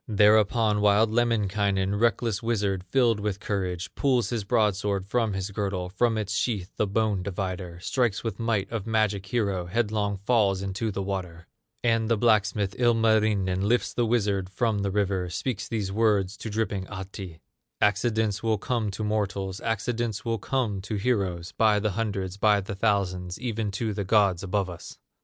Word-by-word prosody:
Thereupon 105 Hz, 0 st, +4 dB
wild 105 Hz, +2 st, +4 dB
Lemminkainen, 100 Hz, -4 st, +1 dB
Reckless 115 Hz, 0 st, +1 dB
wizard, 100 Hz, -5 st, 0 dB
filled 120 Hz, -5 st, +3 dB
with 100 Hz, -1 st, -2 dB
courage, 90 Hz, -5 st, -3 dB
Pulls 130 Hz, -4 st, +1 dB
his 115 Hz, -3 st, -1 dB
broadsword 100 Hz, -3 st, +1 dB
from 110 Hz, 0 st, 0 dB
his 95 Hz, +1 st, -3 dB
girdle, 95 Hz, -3 st, -2 dB
From 110 Hz, +4 st, +1 dB
its 105 Hz, -1 st, -2 dB
sheath, 105 Hz, -5 st, -1 dB
the 105 Hz, -, 0 dB
bone 105 Hz, -1 st, 0 dB
divider, 90 Hz, -2 st, -4 dB
Strikes 115 Hz, +1 st, 0 dB
with 115 Hz, -4 st, -4 dB
might 115 Hz, -4 st, 0 dB
of 115 Hz, -2 st, -4 dB
magic 105 Hz, -3 st, 0 dB
hero, 100 Hz, -5 st, -1 dB
Headlong 105 Hz, 0 st, 0 dB
falls 100 Hz, -2 st, +2 dB
into 100 Hz, +3 st, -2 dB
the 100 Hz, -1 st, -3 dB
water; 90 Hz, -3 st, -5 dB, 0.4 s
And 115 Hz, -1 st, +2 dB
the 115 Hz, -, +3 dB
blacksmith, 105 Hz, -3 st, +2 dB
Ilmarinen, 110 Hz, -5 st, +2 dB
Lifts 115 Hz, +5 st, +1 dB
the 120 Hz, -1 st, +1 dB
wizard 100 Hz, -5 st, 0 dB
from 110 Hz, +2 st, 0 dB
the 100 Hz, 0 st, -1 dB
river, 95 Hz, -2 st, 0 dB
Speaks 110 Hz, +5 st, -3 dB
these 105 Hz, -4 st, -2 dB
words 100 Hz, -3 st, +2 dB
to 110 Hz, -, -6 dB
dripping 100 Hz, -3 st, -2 dB
Ahti: 95 Hz, -3 st, -8 dB, 0.4 s
"Accidents 105 Hz, 0 st, +1 dB
will 110 Hz, -1 st, +1 dB
come 115 Hz, +1 st, -1 dB
to 100 Hz, +2 st, -5 dB
mortals, 100 Hz, -3 st, -2 dB
Accidents 115 Hz, 0 st, -2 dB
will 115 Hz, -1 st, -1 dB
come 110 Hz, -4 st, -1 dB
to 100 Hz, +3 st, -4 dB
heroes, 95 Hz, -6 st, -1 dB
By 110 Hz, -2 st, +3 dB
the 105 Hz, 0 st, 0 dB
hundreds, 100 Hz, -2 st, -3 dB
by 105 Hz, 0 st, +4 dB
the 100 Hz, -, -6 dB
thousands, 95 Hz, -4 st, -1 dB
Even 115 Hz, -4 st, -2 dB
to 110 Hz, +2 st, -2 dB
the 100 Hz, 0 st, -2 dB
gods 100 Hz, -3 st, +3 dB
above 100 Hz, 0 st, -1 dB
us!" 90 Hz, -2 st, -9 dB
105 Hz, 165 wpm, -26 LUFS, 95-110 Hz, 0.4 s, Thereupon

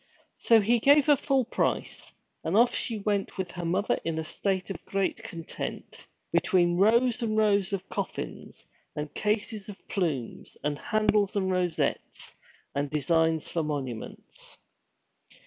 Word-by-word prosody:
So 230 Hz, -1 st, +6 dB
he 235 Hz, +4 st, +3 dB
gave 285 Hz, +4 st, +6 dB
her 295 Hz, -, +6 dB
full 270 Hz, -2 st, +1 dB
price, 245 Hz, -, -2 dB, 0.3 s
and 170 Hz, +6 st, +1 dB
she 230 Hz, -1 st, -2 dB
went 200 Hz, -1 st, -1 dB
off -, -, -18 dB
with 185 Hz, -2 st, -3 dB
her 175 Hz, -1 st, -6 dB
mother 185 Hz, +5 st, +1 dB
in 165 Hz, -1 st, -2 dB
a 160 Hz, -, -1 dB
state 190 Hz, +4 st, -2 dB
of -, -, -7 dB
great 195 Hz, +3 st, -1 dB
content, 170 Hz, -8 st, -7 dB, 0.2 s
between 175 Hz, -2 st, +3 dB
rows 235 Hz, +5 st, +4 dB
and 215 Hz, -2 st, 0 dB
rows 205 Hz, -3 st, +3 dB
of 195 Hz, -1 st, -3 dB
coffins, -, -, -5 dB, 0.3 s
and 150 Hz, -1 st, -4 dB
cases 210 Hz, -1 st, -2 dB
of 200 Hz, -, -11 dB
plumes, 155 Hz, -, -3 dB
and 145 Hz, 0 st, -1 dB
handles 210 Hz, 0 st, +1 dB
and 190 Hz, -2 st, +1 dB
rosettes, 180 Hz, -2 st, -1 dB, 0.4 s
and 140 Hz, +1 st, -1 dB
designs 160 Hz, +2 st, +1 dB
for 165 Hz, -, -1 dB
monuments. 140 Hz, -7 st, -6 dB
195 Hz, 145 wpm, -28 LUFS, 165-215 Hz, 0.4 s, So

